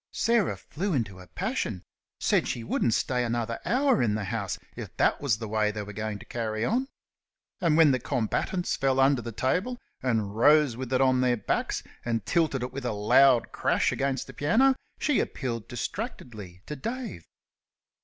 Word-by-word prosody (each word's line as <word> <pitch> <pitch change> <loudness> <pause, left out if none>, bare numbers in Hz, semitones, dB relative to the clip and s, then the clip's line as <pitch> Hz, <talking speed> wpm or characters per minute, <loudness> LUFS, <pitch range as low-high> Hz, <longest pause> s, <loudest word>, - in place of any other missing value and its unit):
Sarah 230 -3 +2
flew 190 +4 -3
into 105 -9 -2
a 90 - -12
passion; 90 - -3 0.4
said - - +2
she 120 - -3
wouldn't 115 0 +1
stay 125 -1 0
another 115 -1 -2
hour 255 +6 +3
in 110 -3 +2
the 110 - -2
house 100 -1 -3 0.2
if - - -8
that - - +2
was 135 -7 +1
the 110 0 -6
way 105 0 +1
they 105 0 -4
were 105 +1 -9
going 105 0 -3
to - - -13
carry 110 -1 -2
on. 255 +3 0 0.7
And 165 -4 +2
when 160 -3 +7
the 130 - +1
combatants 125 - -1
fell 135 -1 +1
under 135 -1 +4
the 115 +1 -6
table 180 - -1 0.2
and 110 -5 -1
rose 145 +1 +5
with 130 0 -6
it 130 - +2
on 130 -1 +4
their 125 -1 +2
backs, - - -1 0.2
and 115 -4 -2
tilted 155 -3 +1
it 125 - -5
with 135 -2 -5
a 115 - -1
loud 120 +4 +4
crash - - +1
against 135 0 -1
the - - -11
piano, 230 - +3 0.2
she 295 -4 +1
appealed 120 -5 -3
distractedly 120 - -6
to 150 - -5
Dave. 230 - -5
125 Hz, 185 wpm, -27 LUFS, 110-150 Hz, 0.7 s, when